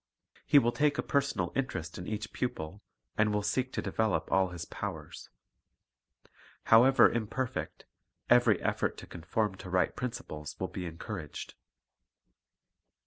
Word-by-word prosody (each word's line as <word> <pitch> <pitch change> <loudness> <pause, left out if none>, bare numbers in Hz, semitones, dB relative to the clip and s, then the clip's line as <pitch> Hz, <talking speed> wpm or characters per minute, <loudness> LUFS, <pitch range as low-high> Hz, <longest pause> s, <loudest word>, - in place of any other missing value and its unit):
He - - +6
will 120 -4 +5
take 145 +2 +2
a - - 0
personal 135 -11 0
interest 90 -13 -3
in 90 - -7
each 105 0 -4
pupil, 100 -6 -4 0.4
and 110 0 +4
will 105 0 0
seek 130 +4 0
to - - -2
develop 110 -3 0
all 95 -1 +4
his 85 -2 -6
powers. - - -6 1.3
How 115 +2 +7
ever 135 0 +7
imperfect, 120 +2 -3 0.4
every - - +5
effort - - 0
to - - -9
conform 95 +5 -2
to 95 0 -9
right 90 0 +1
prin 125 - -1
ciples 75 -12 -8
will 95 - -2
be 90 -1 -5
encouraged. 85 -1 -6
105 Hz, 140 wpm, -31 LUFS, 90-125 Hz, 1.3 s, How